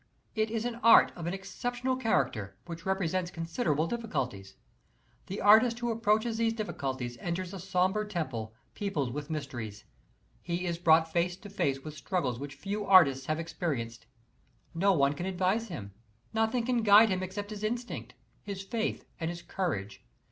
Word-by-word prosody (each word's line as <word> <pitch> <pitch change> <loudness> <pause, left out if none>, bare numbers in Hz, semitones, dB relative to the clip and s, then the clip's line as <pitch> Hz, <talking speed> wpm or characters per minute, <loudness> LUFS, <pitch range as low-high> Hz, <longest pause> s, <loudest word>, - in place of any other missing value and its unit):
It 220 -1 0
is 225 +1 -2
an 240 -1 -3
art 230 0 +7
of 170 -1 -5
an 175 - -1
exceptional 245 +6 -2
character, 135 - 0
which 170 -1 -7
presents 185 -2 0
considerable 165 - -1
difficulties. 135 - -3 0.7
The 195 - -4
artist 225 +4 +6
who 240 -1 -1
approaches 225 0 +1
these 225 -1 +2
difficulties 130 - -4
enters 175 +4 -3
a 195 - -6
sombre 190 +3 +1
temple, 130 - -3 0.2
peopled 150 - -2
with 145 +1 -5
mysteries. 125 -9 -5 0.6
He 175 +1 -2
is 170 -1 -2
brought 160 -1 +4
face 175 +1 +1
to 205 - -11
face 135 -8 0
with 155 +1 -8
struggles 140 - -2
which 140 0 -6
few 200 +8 -3
artists 140 -10 +6
have 155 +1 0
experienced. 140 -9 -3 0.7
No 195 +4 +3
one 140 -5 +3
can 175 +6 -4
advise 190 +5 0
him, 105 - -7 0.4
nothing 225 +2 +1
can 245 -1 +1
guide 215 +1 +7
him 185 -1 0
except 205 +3 -5
his 210 0 -6
instinct, 240 +3 -3 0.3
his 200 -1 -6
faith 220 +3 -2
and 165 -1 -1
his 175 0 -6
courage. 105 - -3
180 Hz, 160 wpm, -30 LUFS, 145-215 Hz, 0.7 s, art